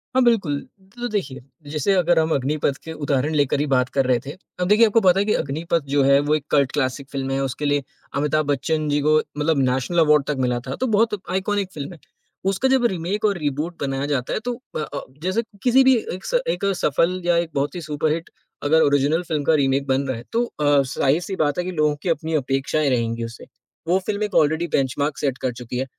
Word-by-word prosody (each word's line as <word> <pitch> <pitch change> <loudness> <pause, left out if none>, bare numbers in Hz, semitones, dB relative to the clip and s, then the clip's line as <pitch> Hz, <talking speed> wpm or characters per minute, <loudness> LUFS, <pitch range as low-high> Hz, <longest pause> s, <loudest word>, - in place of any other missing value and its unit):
हाँ, 260 - +5
बिल्कुल। 195 -12 +2 0.4
तो 245 0 -3
देखिए, 190 - -3 0.3
जैसे 155 +6 +1
अगर 175 -2 +3
हम 160 0 +1
अग्निपथ 140 +1 0
के 160 - -7
उदाहरण 145 0 -1
लेकर 145 -1 +2
ही 150 - +1
बात 125 -1 +2
कर 135 - +3
रहे 125 -2 +2
थे, 140 - -5 0.3
अब 180 - 0
देखिए 215 +4 +6
आपको 225 +1 +3
पता 190 -1 +4
है 200 - +1
कि 210 - +2
अग्निपथ 160 +4 -1
जो 140 - +4
है 140 +1 +5
वो 150 +1 +1
एक 150 -2 -3
कल्ट 140 -3 +3
क्लासिक 135 -1 -2
फ़िल्म 135 -1 -3
है 135 - 0
उसके 135 +3 -3
लिए 145 -1 +1 0.3
अमिताभ 150 +2 +1
बच्चन 155 +2 -1
जी 145 0 +2
को 155 +1 +4 0.2
मतलब 150 0 +1
नेशनल 135 +7 0
अवार्ड 150 -3 +5
तक 150 - 0
मिला 125 -1 0
था 130 - -3
तो 260 - +1
बहुत 225 -1 +2
आइकॉनिक 190 +1 -1
फ़िल्म 145 +1 -6
है। 165 - -14 0.5
उसका 195 +7 +1
जब 260 -2 +3
रीमेक 190 +1 -1
और 200 -3 +2
रिबूट 150 +3 -2
बनाया 135 0 -1
जाता 140 -4 -1
है - - 0
तो 245 - -1 0.2
अ - - -2
अ, 150 - -4 0.2
जैसे 185 +5 +1 0.2
किसी 260 +1 +5
भी 260 -1 +6 0.2
एक 185 - -8
स - - +1
एक 200 - -1
सफल 175 +3 +1
या 175 -1 +3
एक 170 -1 0
बहुत 140 +5 -1
ही 175 - -4
सुपरहिट 155 +2 -2 0.3
अगर 160 +2 +4
ओरिजिनल 145 +4 +3
फ़िल्म 155 -4 -2
का 160 - +3
रीमेक 140 -1 +1
बन 135 +1 +1
रहा 130 - -2
है 115 - -9
तो 235 +1 +1
अ, 145 -8 +2
ज़ाहिर-सी 145 +8 0
बात 145 -3 0
है - - 0
कि 185 - -3
लोगों 150 -3 +1
की 180 - -1
अपनी 160 0 -1
अपेक्षाएँ 140 +1 0
रहेंगी 115 -2 -1
उससे, 115 0 -8 0.4
वो 185 +2 +3
फ़िल्म 210 0 -1
एक 210 - -3
ऑलरेडी 160 +3 +3
बेंचमार्क 140 +2 -1
सेट 135 -3 -1
कर 130 - -2
चुकी 125 +1 -6
है। 130 - -1
150 Hz, 230 wpm, -22 LUFS, 140-180 Hz, 0.5 s, देखिए